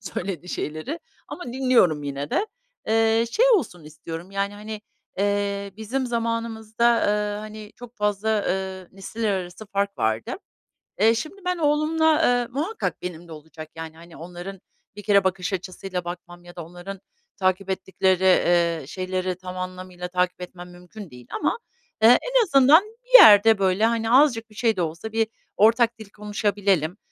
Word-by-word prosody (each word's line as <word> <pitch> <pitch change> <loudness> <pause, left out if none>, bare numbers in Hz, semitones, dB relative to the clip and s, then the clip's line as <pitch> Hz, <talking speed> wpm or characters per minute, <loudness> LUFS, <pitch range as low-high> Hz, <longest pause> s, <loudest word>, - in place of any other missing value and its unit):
söylediği 180 -1 -5
şeyleri 155 - -5 0.3
ama 355 - -7
dinliyorum 245 - +2
yine 140 0 -5
de. 425 - 0 0.4
Eee, 225 +1 +3
şey 460 - +2
olsun 195 - -2
istiyorum 165 +3 -9
yani 200 +1 -2
hani, 210 +1 -7 0.4
eee, 200 0 -1
bizim 250 +5 -3
zamanımızda, 230 -1 -2 0.2
ııı, 210 0 0
hani 215 0 -10
çok 245 0 -12
fazla, 210 0 -1 0.2
ııı, 190 -1 -3
nesiller 210 +3 -3
arası 185 +2 -5
fark 200 0 -2
vardı. 110 0 -1 0.7
Eee, 225 +3 +5
şimdi 315 - -6
ben 360 0 0
oğlumla, 315 +1 +2
eee, 245 -1 +2
muhakkak 320 - -3
benim 175 -1 -7
de 165 - -14
olacak 155 0 -11
yani 160 0 -8
hani 170 0 -14
onların 180 +3 -9 0.3
bir 205 - -9
kere 200 -2 +4
bakış 190 +1 -1
açısıyla 185 0 -5
bakmam 175 0 -8
ya 175 - -13
da 170 - -7
onların 180 +3 -9 0.4
takip 185 0 0
ettikleri, 190 -1 +2 0.4
ııı, 135 - -11
şeyleri 185 +1 -3
tam 185 0 -9
anlamıyla 185 -1 -6
takip 180 0 -1
etmem 180 0 -9
mümkün 180 +3 -12
değil. 125 -2 -14
Ama, 295 +10 -1 0.5
ııı, 225 - +9
en - - +3
azından 295 -1 +6 0.2
bir - - +8
yerde 220 - +8
böyle 195 +3 +2
hani 230 -1 0
azıcık 245 -4 +4
bir 215 - -19
şey 225 0 +1
de 185 - -2
olsa 165 +6 -4
bir 225 0 +1 0.3
ortak 230 +2 +3
dil 215 -2 -11
konuşabilelim. 205 -4 -1
200 Hz, 155 wpm, -23 LUFS, 180-225 Hz, 0.7 s, ııı